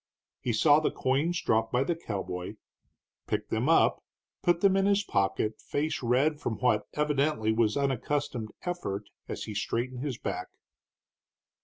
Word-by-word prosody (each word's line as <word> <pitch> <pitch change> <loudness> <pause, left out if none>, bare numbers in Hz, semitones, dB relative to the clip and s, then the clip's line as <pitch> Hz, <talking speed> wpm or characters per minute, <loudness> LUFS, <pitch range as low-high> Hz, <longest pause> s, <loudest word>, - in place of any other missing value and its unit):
He 125 - -1
saw 145 +7 +5
the 155 - +1
coins 150 +7 0
dropped 110 0 +2
by 125 +1 +2
the 170 +3 0
cowboy, 100 - -5 0.7
picked - - -2
them - - +1
up, - - +4 0.4
put 175 0 +2
them 195 -1 +5
in 195 0 +3
his 200 0 +3
pocket, 100 - 0
face 155 +2 -2
red 135 +5 +2
from 120 -6 -2
what 125 -4 +1
evidently 145 -6 +1
was 110 0 +2
unaccustomed 135 -3 -1
effort 175 - -3 0.3
as - - -4
he 110 - -6
straightened 120 +4 -2
his 140 -5 -3
back. - - -4
130 Hz, 150 wpm, -29 LUFS, 110-155 Hz, 0.7 s, saw